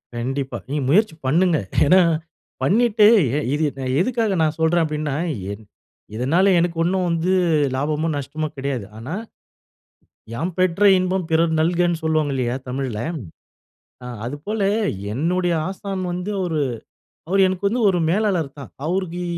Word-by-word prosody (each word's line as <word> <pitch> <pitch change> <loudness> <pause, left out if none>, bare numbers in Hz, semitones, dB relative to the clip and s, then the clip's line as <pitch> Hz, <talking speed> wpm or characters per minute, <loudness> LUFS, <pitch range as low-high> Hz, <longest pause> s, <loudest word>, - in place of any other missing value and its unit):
கண்டிப்பா. 135 +3 -3
நீங்க 140 0 -2
முயற்சி 195 +2 +3
பண்ணுங்க. 170 +4 +3 0.3
ஏன்னா, 185 +6 +6 0.6
பண்ணிட்டு 220 +1 +4 0.3
எ - - +1 0.2
இது 150 +2 0 0.4
எதுக்காக 225 0 +1
நான் 155 0 +1
சொல்றேன் 165 +1 +3
அப்படின்னா, 150 -2 -3 0.4
என் 100 +2 -8 0.5
இதனால 165 - +3
எனக்கு 170 -1 -1
ஒண்ணும் 185 +1 +1
வந்து 170 +2 0 0.4
லாபமோ, 150 +4 -1
நஷ்டமோ 155 +3 -3
கிடையாது. 135 -6 -3
ஆனா, 130 +8 -6 1.2
"யாம் 165 +10 -2
பெற்ற 185 +2 +1
இன்பம் 185 -1 -1
பிறர் 160 0 +2
நல்கனு" 175 0 +1
சொல்வாங்க 155 -3 +1
இல்லையா 125 -1 -1
தமிழ்ல. 125 -4 -3 1.0
அ 125 - -7 0.2
அதுபோல, 150 - -4 0.5
என்னோடய 175 +6 0 0.2
ஆசான் 195 -1 -5
வந்து 180 +3 -3
ஒரு 160 -3 -1 0.7
அவர் 195 +1 +3
எனக்கு 185 +2 -1
வந்து 235 +5 0
ஒரு 180 -2 +1
மேலாளர் 180 -7 0
தான், 135 - -9 0.2
அவருக்கு 180 0 -2
165 Hz, 130 wpm, -21 LUFS, 145-185 Hz, 1.2 s, ஏன்னா